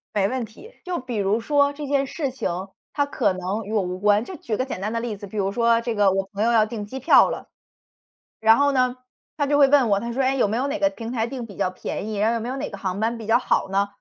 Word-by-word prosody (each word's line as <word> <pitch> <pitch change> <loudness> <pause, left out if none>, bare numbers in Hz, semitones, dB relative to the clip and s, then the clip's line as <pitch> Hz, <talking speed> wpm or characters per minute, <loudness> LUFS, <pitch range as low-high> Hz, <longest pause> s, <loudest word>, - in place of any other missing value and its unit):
没 195 -1 +2
问 255 -2 -2
题。 410 - -15
就 360 -1 -2
比 250 -3 -5
如 205 +3 +1
说 285 +1 +2
这 295 0 -6
件 275 -1 +1
事 280 -2 -3
情， 265 - -3 0.4
它 285 -1 +1
可 285 - 0
能 190 +4 -3
与 215 - -6
我 210 - +2
无 180 0 -4
关， 205 +2 +3
就 375 - -8
举 220 -5 -3
个 255 - 0
简 265 - -5
单 210 +3 -3
的 230 - -1
例 225 -4 -4
子， 205 0 -9
比 215 - -12
如 195 -1 0
说 235 0 +3
这 235 -1 -2
个 205 -2 +4
我 195 0 0
朋 200 +1 -4
友 235 - +3
要 220 -1 +5
订 215 -2 -6
机 265 +5 -7
票 - - +6
了。 - - -6 0.9
然 220 0 +6
后 285 0 +3
呢， 255 -1 +1 0.4
他 285 -2 0
就 290 0 +2
会 280 -1 +7
问 270 -4 +4
我， 200 -1 +3
他 235 +2 -4
说： 270 - 0
“哎， 265 +1 +2
有 245 - +2
没 220 +3 -1
有 270 +3 0
哪 300 +2 -2
个 295 0 +2
平 230 -4 -7
台 230 -2 0
定 240 -2 -6
比 200 - -12
较 185 - 0
便 190 +2 -5
宜， 215 -2 -4
然 215 +2 +2
后 235 - +1
有 - - -1
没 230 - -5
有 265 - -3
哪 270 - -4
个 200 - -8
航 190 0 -3
班 230 +2 0
比 220 - -8
较 225 +2 +4
好 250 - 0
呢？” 200 +1 +2
230 Hz, 320 characters per minute, -23 LUFS, 205-265 Hz, 0.9 s, 会